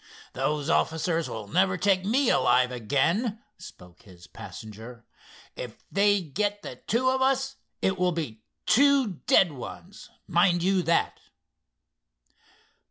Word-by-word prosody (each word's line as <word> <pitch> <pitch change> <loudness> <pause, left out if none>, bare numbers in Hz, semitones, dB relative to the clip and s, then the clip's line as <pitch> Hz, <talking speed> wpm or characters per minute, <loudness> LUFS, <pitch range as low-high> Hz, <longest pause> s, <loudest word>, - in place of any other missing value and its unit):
"Those 150 -1 -2
officers 165 0 0
will 110 -2 -6
never 185 - +1
take 190 0 +2
me 240 +6 +2
alive 125 -8 +3
again," 165 - 0 0.2
spoke 90 -1 -14
his 90 -6 -16
passenger. 110 +2 -11 0.5
"If - - -9
they 205 0 +3
get 205 +6 -2
the - - -8
two 255 +4 0
of 260 0 -1
us 270 +1 0 0.3
it 190 -1 0
will 180 0 +2
be 145 -10 -5 0.2
two 270 - +3
dead 180 -4 +5
ones, 175 +8 -10 0.2
mind 175 0 +2
you, 190 0 +2
that." 170 -1 0
180 Hz, 125 wpm, -26 LUFS, 135-205 Hz, 0.5 s, dead